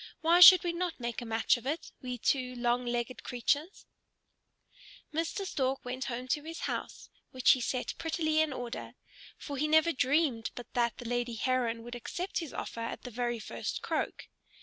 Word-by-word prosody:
Why 335 +2 +5
should 360 0 +11
we 345 -1 -1
not 345 -2 -3
make 235 -1 -3
a 240 - -7
match 225 +2 +2
of 240 - -9
it, 310 +4 -3
we 250 -1 -4
two 250 +1 0
long 240 0 0
legged 240 +1 -2
creatures?" 285 - -1 1.3
Mr. 330 +5 -2
Stork 270 -7 -1
went 255 +1 -4
home 250 0 -4
to 295 - +1
his 325 +1 -7
house, - - -5 0.2
which 255 -1 +4
he 255 - +3
set 250 +1 -2
prettily 315 -1 +1
in 315 -2 +1
order: 245 -3 -6 0.4
for 285 -2 -6
he 300 +3 +1
never 315 +2 +4
dreamed 265 -4 +1
but 245 -1 -9
that 235 -1 +1
the 245 - -7
lady 240 0 -1
Heron 235 -1 0
would 240 +1 -8
accept 350 - -4
his 325 -5 -6
offer - - -6
at 230 - -5
the 250 - -7
very 240 +1 -1
first 215 - -5
croak. - - -2
255 Hz, 185 wpm, -31 LUFS, 240-315 Hz, 1.3 s, should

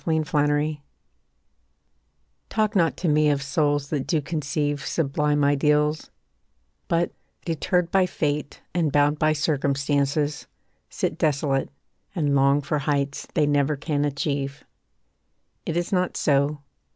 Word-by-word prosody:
CIRCUMSTANCE 150 -1 +1 1.7
Talk 215 -1 0
not 170 -4 +2
to 175 - -2
me 150 0 +4
of 140 -1 0
souls 145 0 0
that 145 -4 -2
do 160 - +2
conceive 145 -1 -2
Sublime 150 -1 0
ideals, 150 +2 +2 0.8
but, 170 0 +1 0.3
deterred 170 +1 0
by 190 -1 +3
Fate 150 -3 -3
And 165 -4 +1
bound 145 +1 +2
by 155 0 +3
circumstances, 145 0 0 0.4
sit - - -3
desolate, 140 -2 +1 0.5
And 150 -5 +1
long 140 +1 +4
for 145 +2 -1
heights 140 -1 -1
they 150 - +3
never 145 0 +2
can 145 0 -1
achieve. 140 -1 -2 1.0
It 165 - -1
is 175 0 -2
not 180 -1 0
so. 145 0 +1
145 Hz, 120 wpm, -24 LUFS, 140-155 Hz, 1.7 s, me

